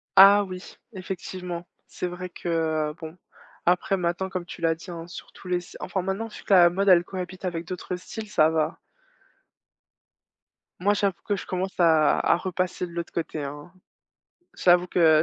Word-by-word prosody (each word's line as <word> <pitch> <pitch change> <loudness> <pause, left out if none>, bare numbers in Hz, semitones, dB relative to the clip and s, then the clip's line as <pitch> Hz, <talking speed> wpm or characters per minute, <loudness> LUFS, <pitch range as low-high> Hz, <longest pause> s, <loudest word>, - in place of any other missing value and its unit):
Ah 200 +1 +9
oui, 185 -2 -8 0.2
effectivement. 180 -2 -6 0.2
C'est - - -5
vrai 180 +1 -6
que, 175 - -9
heu, 160 -2 0
bon 160 +1 -8 0.5
après 180 +2 +2
maintenant 175 +1 -1
comme 185 -2 -4
tu - - -9
l'as 165 -1 +2
dit 165 +3 -10
hein, 165 -1 -7
sur 175 - -10
tous - - -13
les 180 0 +1
s 175 0 -9
enfin 190 - -2
maintenant, 195 +5 -2
vu 215 - -11
que - - +1
la 175 -2 +8
mode, 195 +3 +1
elle 175 -2 +7
cohabite 185 0 -6
avec 170 -2 -3
d'autres 180 +1 -5
styles, 215 +4 -8
ça 155 -6 +4
va. 160 +1 0 2.0
Moi, 205 +3 +3
j'avoue 200 -2 0
que 205 - +2
je - - -6
commence 185 +1 -3
à 160 -3 +5
à - - +3
repasser 180 0 -2
de - - -13
l'autre 170 0 -5
côté 160 -3 -3
hein. 145 +4 -7 0.8
J'avoue 180 0 +4
que 160 -3 +5
180 Hz, 180 wpm, -26 LUFS, 170-190 Hz, 2.0 s, Ah